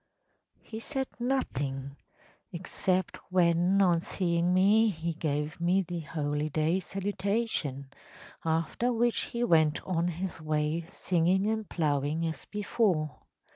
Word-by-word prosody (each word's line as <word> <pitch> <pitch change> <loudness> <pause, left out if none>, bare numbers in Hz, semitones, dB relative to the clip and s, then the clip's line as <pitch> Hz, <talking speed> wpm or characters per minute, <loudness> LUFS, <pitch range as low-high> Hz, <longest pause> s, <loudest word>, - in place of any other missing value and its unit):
‚ÄĚ - - -38
“He 220 - -6
said 265 +2 -3
nothing‚ÄĒexcept 170 - -3
when, 180 +2 +3
on 175 -3 +3
seeing 170 -1 0
me, 205 +5 +5
he 165 -3 -3
gave 150 0 -2
me 180 +3 +3
the 175 0 -4
holy 150 0 -2
day 155 +4 +1
salutation, 195 - -2 0.5
after 165 +9 0
which 240 0 +1
he 235 0 -3
went 155 -7 +4
on 175 -2 0
his 175 0 -4
way 155 +1 -1
singing 180 +2 +1
and 220 -1 -1
ploughing 150 0 0
as 160 -3 -4
before. 195 - 0
170 Hz, 120 wpm, -29 LUFS, 155-195 Hz, 0.5 s, me